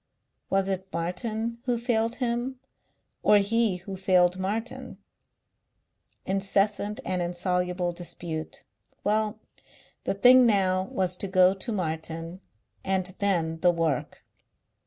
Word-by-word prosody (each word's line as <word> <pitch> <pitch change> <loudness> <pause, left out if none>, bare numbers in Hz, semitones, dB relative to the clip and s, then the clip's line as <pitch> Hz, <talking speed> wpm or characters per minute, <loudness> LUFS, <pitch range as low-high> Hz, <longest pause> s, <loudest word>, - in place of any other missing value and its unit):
Was 195 0 +1
it 190 -1 -2
Martin 215 +7 -3
who 245 -2 +1
failed 230 -1 0
him 245 +1 -2 0.6
or 210 - +6
he 215 0 +2
who 190 +2 -8
failed 185 -1 +3
Martin? 220 +6 -4 1.3
Incessant 200 +2 +1
and 185 -1 -1
insoluble 180 0 -1
dispute. 170 -2 -6 0.4
Well, 215 0 +1 0.7
the - - 0
thing 250 +4 +7
now 190 -3 +2
was 185 -1 -1
to 200 - -2
go 185 0 +5
to 195 +4 -3
Martin.... 165 -1 -4 0.4
And 190 -1 -1
then 165 -5 0
the 180 - +4
work! 165 -6 -1
190 Hz, 115 wpm, -27 LUFS, 180-215 Hz, 1.3 s, thing